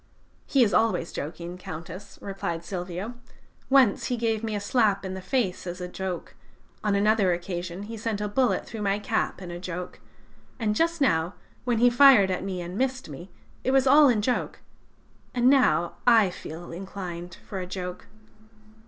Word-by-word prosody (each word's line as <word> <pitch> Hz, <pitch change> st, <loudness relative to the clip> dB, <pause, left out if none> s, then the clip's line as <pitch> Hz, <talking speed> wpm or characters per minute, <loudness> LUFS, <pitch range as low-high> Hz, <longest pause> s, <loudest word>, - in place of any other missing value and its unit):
"'He 270 Hz, -3 st, +4 dB
is 215 Hz, -, +1 dB
always 225 Hz, -7 st, +2 dB
joking, 170 Hz, +4 st, -6 dB
Countess,' 170 Hz, +4 st, -8 dB
replied 170 Hz, -4 st, -4 dB
Silvio: 180 Hz, +4 st, -5 dB, 0.6 s
'once 265 Hz, -6 st, +4 dB
he 245 Hz, -, -1 dB
gave 225 Hz, -1 st, 0 dB
me 220 Hz, -1 st, -2 dB
a -, -, -1 dB
slap 205 Hz, -2 st, +1 dB
in 190 Hz, -, -4 dB
the 190 Hz, -, -6 dB
face 190 Hz, -4 st, -1 dB
in 175 Hz, -, -3 dB
a 180 Hz, 0 st, -6 dB
joke; 185 Hz, -1 st, -5 dB, 0.5 s
on 210 Hz, -1 st, +2 dB
another 205 Hz, -2 st, +3 dB
occasion 175 Hz, +1 st, -4 dB
he 225 Hz, +2 st, -7 dB
sent 215 Hz, -1 st, -2 dB
a 210 Hz, -, -1 dB
bullet 250 Hz, +4 st, +1 dB
through 225 Hz, -, -7 dB
my 200 Hz, -1 st, +1 dB
cap 210 Hz, -3 st, -2 dB
in 175 Hz, -, -7 dB
a 175 Hz, -, -6 dB
joke; 180 Hz, 0 st, -6 dB, 0.6 s
and 220 Hz, -3 st, 0 dB
just 335 Hz, +4 st, +1 dB
now, 165 Hz, -8 st, +2 dB, 0.3 s
when 240 Hz, -2 st, +1 dB
he 245 Hz, +2 st, +5 dB
fired 245 Hz, -7 st, +7 dB
at 185 Hz, -, -2 dB
me 190 Hz, -2 st, -3 dB
and 180 Hz, +3 st, -6 dB
missed 260 Hz, -5 st, -1 dB
me, 160 Hz, +6 st, -9 dB, 0.3 s
it -, -, 0 dB
was 270 Hz, 0 st, +4 dB
all 285 Hz, +2 st, +7 dB
in 240 Hz, -, +3 dB
a -, -, 0 dB
joke. 245 Hz, +3 st, -1 dB, 0.7 s
And 245 Hz, +1 st, +5 dB
now 255 Hz, -10 st, +3 dB
I 225 Hz, -6 st, +6 dB
feel 170 Hz, 0 st, -8 dB
inclined 175 Hz, -1 st, -7 dB
for 195 Hz, -, -4 dB
a 180 Hz, -, -5 dB
joke.' 180 Hz, -1 st, -6 dB
200 Hz, 180 wpm, -26 LUFS, 180-230 Hz, 0.7 s, fired